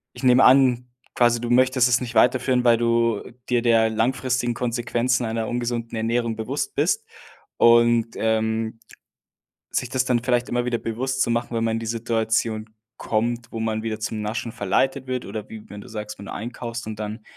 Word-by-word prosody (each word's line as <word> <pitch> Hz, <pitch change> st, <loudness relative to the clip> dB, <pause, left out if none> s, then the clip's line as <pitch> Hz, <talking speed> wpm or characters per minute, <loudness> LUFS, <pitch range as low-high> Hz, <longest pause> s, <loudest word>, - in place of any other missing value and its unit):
ich -, -, -10 dB
nehme 125 Hz, +1 st, +6 dB
an, 125 Hz, -2 st, +5 dB, 0.3 s
quasi 120 Hz, -1 st, +3 dB
du 120 Hz, 0 st, -4 dB
möchtest 130 Hz, 0 st, +4 dB
es 125 Hz, +1 st, +2 dB
nicht 120 Hz, -1 st, -6 dB
weiterführen, 125 Hz, +1 st, +3 dB
weil 120 Hz, -1 st, +5 dB
du 115 Hz, -2 st, +1 dB, 0.3 s
dir 120 Hz, -1 st, +2 dB
der 115 Hz, -2 st, +3 dB
langfristigen 120 Hz, +2 st, 0 dB
Konsequenzen 120 Hz, +1 st, -1 dB
einer 110 Hz, 0 st, -2 dB
ungesunden 120 Hz, -1 st, -3 dB
Ernährung 115 Hz, 0 st, -1 dB
bewusst 110 Hz, -, -3 dB
bist. -, -, +1 dB, 0.5 s
Und, 115 Hz, -1 st, +4 dB
ähm, 110 Hz, 0 st, -1 dB, 0.9 s
sich 125 Hz, -, -1 dB
das 130 Hz, +1 st, 0 dB
dann 125 Hz, -2 st, +2 dB
vielleicht 125 Hz, -1 st, +1 dB
immer 120 Hz, 0 st, 0 dB
wieder 125 Hz, -1 st, 0 dB
bewusst 130 Hz, +4 st, -1 dB
zu -, -, -1 dB
machen, 120 Hz, 0 st, -2 dB
wenn 115 Hz, -, 0 dB
man 115 Hz, 0 st, 0 dB
in -, -, -3 dB
die 115 Hz, -, -6 dB
Situation 110 Hz, -1 st, -1 dB, 0.3 s
kommt, 115 Hz, +1 st, -2 dB
wo 115 Hz, -, -5 dB
man 110 Hz, -1 st, -1 dB
wieder 110 Hz, -1 st, -4 dB
zum 110 Hz, 0 st, -3 dB
Naschen 110 Hz, +2 st, -3 dB
verleitet 130 Hz, +7 st, 0 dB
wird, 125 Hz, -1 st, -3 dB
oder 105 Hz, +1 st, -7 dB
wie 110 Hz, -1 st, -10 dB
wenn 105 Hz, 0 st, -9 dB
du -, -, -13 dB
sagst, 105 Hz, -1 st, -7 dB
wenn 100 Hz, -, -9 dB
du -, -, -7 dB
einkaufst 120 Hz, +1 st, -6 dB
und 110 Hz, -1 st, -7 dB
dann 105 Hz, +1 st, -5 dB
115 Hz, 185 wpm, -23 LUFS, 110-125 Hz, 0.9 s, nehme